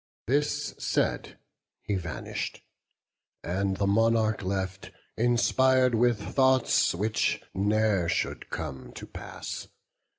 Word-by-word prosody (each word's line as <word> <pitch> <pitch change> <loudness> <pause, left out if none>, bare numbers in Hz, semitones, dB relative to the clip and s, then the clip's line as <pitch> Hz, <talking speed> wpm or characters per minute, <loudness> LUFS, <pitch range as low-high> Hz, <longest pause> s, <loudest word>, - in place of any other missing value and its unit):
This 145 +3 0
said, - - -1 0.5
he 105 - -2
vanish'd; 85 -4 -4 0.8
and 95 +2 -1
the 100 - +1
monarch 110 +1 +2
left, 95 0 -3 0.3
Inspir'd 125 +2 +3
with 120 -1 +3
thoughts 130 -8 +3
which 105 +4 0
ne'er 100 -2 +2
should - - -2
come 65 -3 -6
to - - -8
pass. - - -7
110 Hz, 100 wpm, -28 LUFS, 95-120 Hz, 0.8 s, Inspir'd